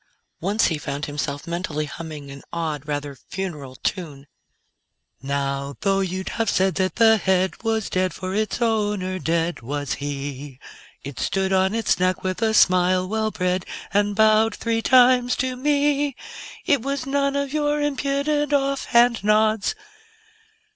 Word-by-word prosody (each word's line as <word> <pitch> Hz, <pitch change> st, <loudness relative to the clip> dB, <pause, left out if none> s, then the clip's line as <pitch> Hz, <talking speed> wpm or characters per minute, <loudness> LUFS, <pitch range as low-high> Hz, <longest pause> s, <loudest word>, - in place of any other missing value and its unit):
Once 200 Hz, +5 st, +1 dB
he 160 Hz, -3 st, -2 dB
found 140 Hz, +1 st, -4 dB
himself 145 Hz, -1 st, -4 dB
mentally 170 Hz, -3 st, -3 dB
humming 150 Hz, -2 st, -8 dB
an 140 Hz, 0 st, -10 dB
odd, 155 Hz, -4 st, -3 dB
rather 145 Hz, -1 st, -3 dB, 0.2 s
funeral 150 Hz, -9 st, -5 dB
tune: 145 Hz, -2 st, -4 dB, 1.0 s
_Now, 140 Hz, 0 st, -2 dB
though 195 Hz, -1 st, +2 dB
you'd 190 Hz, 0 st, -2 dB
have 225 Hz, -2 st, -1 dB
said 190 Hz, 0 st, +2 dB
that 185 Hz, -3 st, -1 dB
the 225 Hz, -1 st, +6 dB
head 190 Hz, -1 st, 0 dB
was 225 Hz, -2 st, -1 dB
dead, 185 Hz, 0 st, 0 dB
For 185 Hz, 0 st, -5 dB
its 215 Hz, +3 st, -1 dB
owner 205 Hz, -4 st, 0 dB
dead 170 Hz, -1 st, -1 dB
was 145 Hz, +4 st, -3 dB
he, 140 Hz, -1 st, -5 dB, 0.5 s
It 140 Hz, -1 st, -7 dB
stood 190 Hz, 0 st, 0 dB
on 190 Hz, +2 st, +2 dB
its 225 Hz, -5 st, +1 dB
neck 185 Hz, 0 st, +1 dB
with 185 Hz, +3 st, -2 dB
a 220 Hz, -1 st, +2 dB
smile 185 Hz, -1 st, +4 dB
well 220 Hz, +2 st, 0 dB
bred, 180 Hz, -2 st, -1 dB, 0.3 s
And 205 Hz, 0 st, +2 dB
bowed 220 Hz, +1 st, +4 dB
three 230 Hz, -1 st, -1 dB
times 250 Hz, 0 st, +5 dB
to 255 Hz, 0 st, -2 dB
me. 285 Hz, 0 st, +1 dB, 0.5 s
It 285 Hz, -8 st, +3 dB
was 275 Hz, 0 st, -3 dB
none 280 Hz, 0 st, 0 dB
of 280 Hz, 0 st, -2 dB
your 295 Hz, -1 st, +1 dB
impudent, 290 Hz, +1 st, 0 dB
off 275 Hz, -1 st, +1 dB
hand 235 Hz, -2 st, +3 dB
nods.... 215 Hz, -, +2 dB
190 Hz, 150 wpm, -23 LUFS, 160-235 Hz, 1.0 s, the